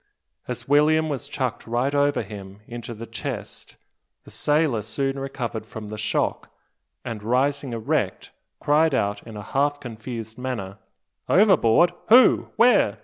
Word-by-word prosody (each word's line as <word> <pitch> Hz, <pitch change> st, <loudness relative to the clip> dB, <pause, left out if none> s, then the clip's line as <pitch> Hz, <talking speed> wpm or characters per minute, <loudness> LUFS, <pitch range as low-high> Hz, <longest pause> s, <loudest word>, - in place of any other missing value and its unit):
As -, -, -6 dB
William 155 Hz, +2 st, +4 dB
was 140 Hz, -1 st, -4 dB
chucked 130 Hz, -5 st, -3 dB
right 120 Hz, +4 st, 0 dB
over 145 Hz, -2 st, +2 dB
him 100 Hz, -1 st, -10 dB
into 120 Hz, 0 st, -7 dB
the 115 Hz, +2 st, -8 dB
chest 115 Hz, -3 st, -7 dB, 0.5 s
the -, -, -15 dB
sailor 145 Hz, -6 st, +1 dB
soon 135 Hz, +6 st, -2 dB
recovered 125 Hz, -5 st, -4 dB
from 110 Hz, -2 st, -8 dB
the 110 Hz, -, -6 dB
shock, 105 Hz, -, -1 dB, 0.6 s
and 115 Hz, -3 st, -5 dB
rising 130 Hz, +4 st, 0 dB
erect, 115 Hz, -2 st, -2 dB, 0.3 s
cried 150 Hz, 0 st, +3 dB
out 100 Hz, 0 st, -1 dB
in 110 Hz, -2 st, -8 dB
a 105 Hz, -, -7 dB
half 145 Hz, +5 st, 0 dB
confused 115 Hz, -2 st, -7 dB
manner, 110 Hz, -7 st, -5 dB, 0.5 s
"Overboard! 175 Hz, -, +5 dB, 0.2 s
Who? 245 Hz, +3 st, +6 dB
Where? 225 Hz, -, +4 dB
125 Hz, 140 wpm, -24 LUFS, 110-145 Hz, 0.6 s, Who